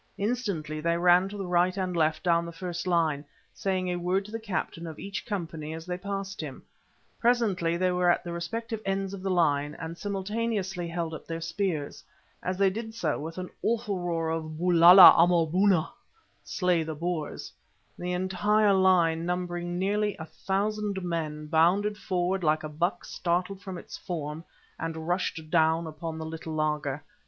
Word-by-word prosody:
Instantly 200 - -2
they 170 +1 +1
ran 180 +2 +4
to 205 - -7
the 195 - -4
right 180 +1 +2
and 185 -2 -2
left 160 -1 +1
down 170 -1 +3
the 170 - -6
first 175 +1 -5
line, 160 -5 +1 0.3
saying 185 -2 -1
a 180 0 -1
word 180 +3 0
to 210 - -11
the 225 - -4
captain 185 -5 -4
of 160 -2 -8
each 200 +3 -6
company 165 -6 -4
as 165 0 -8
they 180 0 -3
passed 195 0 -5
him. 145 -4 -7 0.6
Presently 205 -9 +2
they 185 +1 +2
were 180 0 +2
at 175 - +2
the 175 - -5
respective 225 +6 -4
ends 195 0 -2
of 195 - -6
the 195 - -2
line, 150 -5 +1
and 165 0 -6
simultaneously 200 -1 -2
held 165 -1 -3
up 160 - -8
their 165 0 -4
spears. 165 -3 -3 0.4
As 185 0 -2
they 195 -1 +3
did 225 +2 -6
so, 160 -9 -1
with 165 +3 -6
an 185 0 -5
awful 220 -4 0
roar 165 -2 -1
of 155 -1 -4
"Bulala 175 +2 +9
Amaboona"—"Slay 180 - +1
the 160 0 -4
Boers," 170 0 -4 0.4
the 180 +1 -4
entire 195 +3 +2
line, 175 -4 +3
numbering 175 -1 -2
nearly 205 +2 0
a 160 - -6
thousand 200 +4 -2
men, 155 -3 -3
bounded 175 +7 +3
forward 185 -2 -1
like 155 0 +2
a 155 - -4
buck 175 +4 -2
startled 180 +3 -2
from 190 -3 -6
its - - -9
form, 155 -2 -5 0.4
and 160 0 -4
rushed 175 -3 -2
down 160 0 +3
upon 160 +1 -6
the 160 - -5
little 160 0 -6
laager. 150 -2 -1
175 Hz, 170 wpm, -28 LUFS, 165-195 Hz, 0.6 s, Bulala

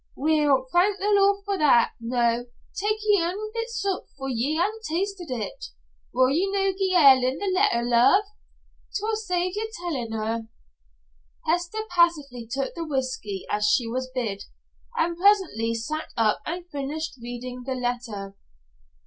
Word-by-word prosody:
Weel, 295 -3 +2
thank 380 +3 +3
the 405 +2 0
Lord 400 0 +3
for 400 -2 -1
that. 265 -6 +5
Noo, 235 0 0 0.3
tak 425 +2 0
ye 415 -3 +4
anither 395 +6 -3
bit 460 0 -3
sup, 400 -5 -2
for 270 -1 -4
ye 260 +5 0
ha'e 345 +4 +3
na 440 +1 -7
tasted 370 +1 -2
it. 230 -6 -4 0.5
Wull 255 0 +3
ye 355 +7 +1
no 390 -1 +2
gie 380 -1 0
Ellen 265 -5 +6
the 400 -1 -1
letter, 370 - +3
love? 245 +11 +5 0.7
'Twill 435 +2 -1
save 365 -3 -1
ye 440 +1 -2
tellin' 295 - -4
her." 225 +1 -2 1.0
Hester 350 +6 0
passively 295 -9 +2
took 270 +2 -2
the 335 - -4
whisky 255 - -3
as 210 0 +1
she 235 +2 +2
was 255 +2 -3
bid, 230 -6 -3 0.5
and 340 0 +1
presently 350 - +3
sat 305 +8 -4
up 220 -2 +2
and 345 +2 -4
finished 290 0 -4
reading 245 +1 -6
the 260 +1 -3
letter. 240 -6 -3
300 Hz, 155 wpm, -25 LUFS, 245-385 Hz, 1.0 s, Ellen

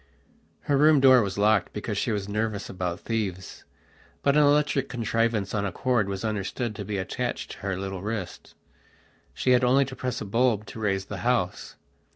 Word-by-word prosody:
Her 145 - +1
room 150 +1 +6
door 130 -2 +7
was 100 -2 -3
locked 105 -2 +2
because 105 0 -4
she 115 - -1
was 100 -2 -2
nervous 105 -1 -2
about 90 -2 -4
thieves; 100 -5 -4 0.6
but 140 0 +3
an 150 - +6
electric 145 -1 +2
contrivance 115 -3 -1
on 105 -2 0
a 100 - -2
cord 120 -2 0
was 100 +2 -4
understood 110 +2 -3
to 105 - -4
be 100 0 -3
attached 120 +6 -3
to - - -9
her 95 -2 -3
little 95 -1 -5
wrist. 105 -3 -6 0.8
She 130 - +1
had 125 0 +4
only 135 +3 +4
to 130 - -8
press 125 -2 -3
a - - -5
bulb 115 0 +1
to 110 - -9
raise 95 -3 -1
the 100 - -6
house. 115 -3 -1
110 Hz, 190 wpm, -26 LUFS, 100-125 Hz, 0.8 s, door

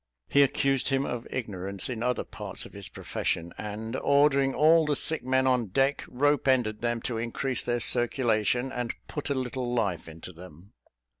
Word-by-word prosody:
He 140 - +4
accused 135 -1 +2
him 135 0 +1
of 120 -1 -5
ignorance 100 -5 -3
in 120 -3 -4
other 125 +1 0
parts - - -6
of - - -13
his - - -9
profession; 85 +1 -3
and, 105 +2 -6
ordering 140 -1 +3
all 160 +2 +5
the 150 -1 0
sick 160 +1 +3
men 130 +1 +1
on 125 -3 +2
deck, 135 +9 +1
rope 145 +2 +1
ended 120 -5 +2
them 120 -1 -1
to 115 -3 -3
increase 120 +2 -1
their 120 0 -1
circulation, 120 0 +2
and 125 -2 -3
put 150 - -5
a 140 - 0
little 125 -1 -3
life 95 -8 -1
into 80 +3 -10
them. 90 +2 -14
125 Hz, 175 wpm, -27 LUFS, 110-135 Hz, -, all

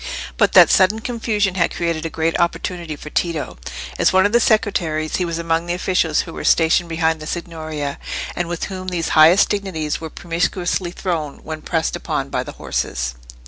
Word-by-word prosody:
But - - +2
that - - +8
sudden 205 +3 +4
confusion 220 -5 0
had 175 -3 0
created 165 -1 -1
a - - -6
great 165 +1 -1
opportunity 170 -1 -1
for 150 +1 -10
Tito. 165 - -2 0.4
As - - +4
one 190 +1 +4
of 205 - +2
the 235 - +5
secretaries 175 -9 +1
he 180 - 0
was 170 -1 -3
among 165 0 -1
the 175 - 0
officials 180 -4 +1
who 165 - -9
were - - -6
stationed 170 +1 +3
behind 160 -1 +1
the 155 - -8
Signoria, 155 -4 -4 0.4
and 175 - -2
with 175 -1 -4
whom 185 -1 -5
these 175 -3 -2
highest 160 +5 +6
dignities 185 -8 -2
were 160 - -5
promiscuously 175 +2 -1
thrown 165 -5 -3
when 155 0 -6
pressed 160 0 -1
upon - - -3
by - - 0
the - - -7
horses. - - -2
170 Hz, 185 wpm, -20 LUFS, 160-185 Hz, 0.4 s, that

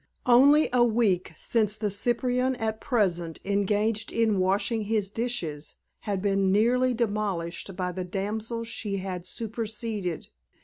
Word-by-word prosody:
Only 280 +5 +6
a 245 -1 +5
week 215 -7 +2
since 215 -2 +1
the 210 -2 -1
cyprian 250 +4 0
at 220 -2 -3
present 175 - 0
engaged 205 +2 0
in 220 -4 +2
washing 200 +4 +1
his 205 -2 -1
dishes 180 -11 -3 0.2
had 200 -3 -3
been 195 -1 +2
nearly 245 +5 +3
demolished 200 -5 -2
by 180 -1 -2
the 185 +1 -4
damsel 215 +5 -3
she 215 -3 -3
had 185 -2 -5
superseded. 220 -5 -4
210 Hz, 130 wpm, -27 LUFS, 195-230 Hz, 0.2 s, Only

